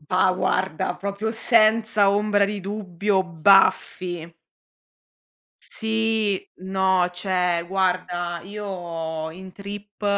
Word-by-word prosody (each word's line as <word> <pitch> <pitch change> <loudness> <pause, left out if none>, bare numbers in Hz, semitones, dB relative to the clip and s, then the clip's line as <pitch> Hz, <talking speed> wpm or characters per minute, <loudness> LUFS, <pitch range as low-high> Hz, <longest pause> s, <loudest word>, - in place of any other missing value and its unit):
Bah 185 +4 +2
guarda, 185 -2 -1
proprio 200 +3 -3
senza 220 -2 +3
ombra 205 0 +2
di 205 0 -3
dubbio 200 0 -1
Buffy. 175 -1 +2 1.3
Sì, 220 -2 -1 0.2
no, 190 -1 +2
cioè 180 -2 0
guarda, 180 -2 -1
io 170 -5 -5
in 185 +2 -11
trip 205 +1 -9
190 Hz, 90 wpm, -23 LUFS, 180-205 Hz, 1.3 s, senza